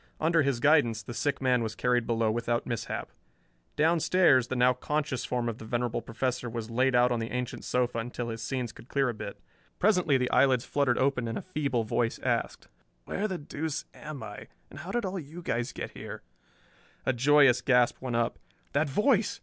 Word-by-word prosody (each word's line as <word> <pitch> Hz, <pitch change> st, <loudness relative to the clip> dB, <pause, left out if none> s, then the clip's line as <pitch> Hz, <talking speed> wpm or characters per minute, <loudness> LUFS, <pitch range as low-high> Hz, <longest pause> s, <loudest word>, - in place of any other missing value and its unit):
Under 165 Hz, +1 st, +3 dB
his 140 Hz, -4 st, 0 dB
guidance 120 Hz, -6 st, +3 dB
the 120 Hz, -, -7 dB
sick 140 Hz, +2 st, -1 dB
man 125 Hz, -2 st, +3 dB
was 110 Hz, -1 st, -3 dB
carried 125 Hz, -1 st, +1 dB
below 115 Hz, -2 st, +1 dB
without 120 Hz, +1 st, -1 dB
mishap. 120 Hz, -3 st, -4 dB, 0.6 s
Downstairs 160 Hz, -4 st, +4 dB
the 130 Hz, -, -3 dB
now 125 Hz, 0 st, +4 dB
conscious 140 Hz, 0 st, -2 dB
form 120 Hz, -1 st, -1 dB
of 115 Hz, -1 st, -4 dB
the -, -, -8 dB
venerable 120 Hz, +1 st, -1 dB
Professor 125 Hz, +1 st, -2 dB
was 115 Hz, -1 st, -5 dB
laid 130 Hz, +2 st, +2 dB
out 125 Hz, 0 st, +4 dB
on 120 Hz, -, +1 dB
the 115 Hz, 0 st, -3 dB
ancient 125 Hz, -1 st, -4 dB
sofa 125 Hz, -2 st, 0 dB
until 120 Hz, +1 st, -4 dB
his 115 Hz, -1 st, -5 dB
senses 125 Hz, -1 st, -3 dB
could -, -, -14 dB
clear 135 Hz, -2 st, +1 dB
a -, -, -2 dB
bit. 105 Hz, -2 st, -7 dB, 0.4 s
Presently 180 Hz, -8 st, +3 dB
the 125 Hz, -1 st, -1 dB
eyelids 130 Hz, -3 st, +4 dB
fluttered 140 Hz, -4 st, +1 dB
open 130 Hz, -3 st, +1 dB
and 115 Hz, -, -3 dB
a -, -, -5 dB
feeble 140 Hz, -9 st, -1 dB
voice 115 Hz, +1 st, 0 dB
asked, -, -, -1 dB, 0.4 s
"Where 210 Hz, -, -2 dB
the 190 Hz, -3 st, -3 dB
deuce 150 Hz, 0 st, -4 dB
am 150 Hz, -5 st, -8 dB
I, 105 Hz, -1 st, -8 dB, 0.2 s
and 140 Hz, -, -10 dB
how 175 Hz, +4 st, -8 dB
did 240 Hz, +1 st, -1 dB
all 190 Hz, 0 st, -3 dB
you 165 Hz, +3 st, -9 dB
guys 120 Hz, -1 st, -1 dB
get -, -, -6 dB
here?" -, -, -8 dB, 0.8 s
A 130 Hz, -, +2 dB
joyous 135 Hz, 0 st, +5 dB
gasp 125 Hz, -2 st, +3 dB
went 125 Hz, -2 st, -3 dB
up. 115 Hz, 0 st, 0 dB, 0.3 s
That 145 Hz, +1 st, +1 dB
voice! 210 Hz, -, +2 dB
125 Hz, 200 wpm, -29 LUFS, 120-145 Hz, 0.8 s, joyous